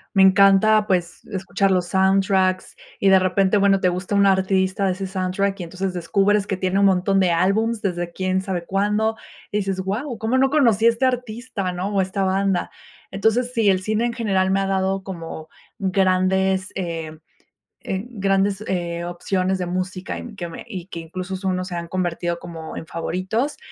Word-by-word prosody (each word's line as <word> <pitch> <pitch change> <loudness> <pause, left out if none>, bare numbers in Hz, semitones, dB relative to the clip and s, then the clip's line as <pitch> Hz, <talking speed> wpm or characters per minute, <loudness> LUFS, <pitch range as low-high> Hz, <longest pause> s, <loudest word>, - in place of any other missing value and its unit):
Me 190 - +6
encanta, 195 +3 +5
pues, 175 -2 -1
escuchar 195 -1 -1
los 180 -2 +2
soundtracks 190 -1 +2 0.2
y, 195 - +3
de 190 - +7
repente, 190 +2 +2
bueno, 195 -1 +4
te 185 - +2
gusta 185 +3 -3
un 200 - +4
artista 190 0 +2
de 185 - +1
ese 195 +1 -5
soundtrack 190 +1 -1
y, - - -4
entonces, 185 +2 -4
descubres 200 +4 +1
que 195 - -2
tiene 185 +1 0
un 200 - +5
montón 190 +1 +2
de 185 -2 +3
álbums 210 +6 +1
desde 175 -3 -2
quién 185 +1 -1
sabe 185 -3 -4
cuándo, 210 +4 0 0.4
y 210 - 0
dices: 195 -2 -1
"Guau, 225 +6 -3
cómo 230 +4 0
no 270 0 +4
conocía 230 -7 +4
este 235 +3 0
artista, 240 -5 -2
¿no? 180 +3 -3
o 195 - +3
esta 190 +1 -1
banda". 190 -1 0 0.4
Entonces, 225 +5 +1
sí, 225 -4 +3
el 185 -1 +3
cine 215 +3 0
en 235 - -3
general 190 -5 0
me 195 +1 +2
ha - - 0
dado 190 0 0
como 165 -4 -7 0.3
grandes, 190 -1 +1
em, 165 -4 -5 0.7
eh, 190 +1 -2
grandes, 195 -2 0
eh, 170 -2 -2
opciones 185 +2 -1
de 180 - -2
música 185 +1 -3
y, - - -7
mm, 225 -4 -10
que 175 -3 -5
me - - -9
y 185 -5 -7
que 170 - -8
incluso 185 +3 -6
son, 185 -1 -1
o - - -2
se 180 -1 -6
han 170 0 -4
convertido 175 -1 -2
como 165 -2 -8
en 160 - -7
favoritos. 185 - -2
190 Hz, 190 wpm, -22 LUFS, 185-200 Hz, 0.7 s, de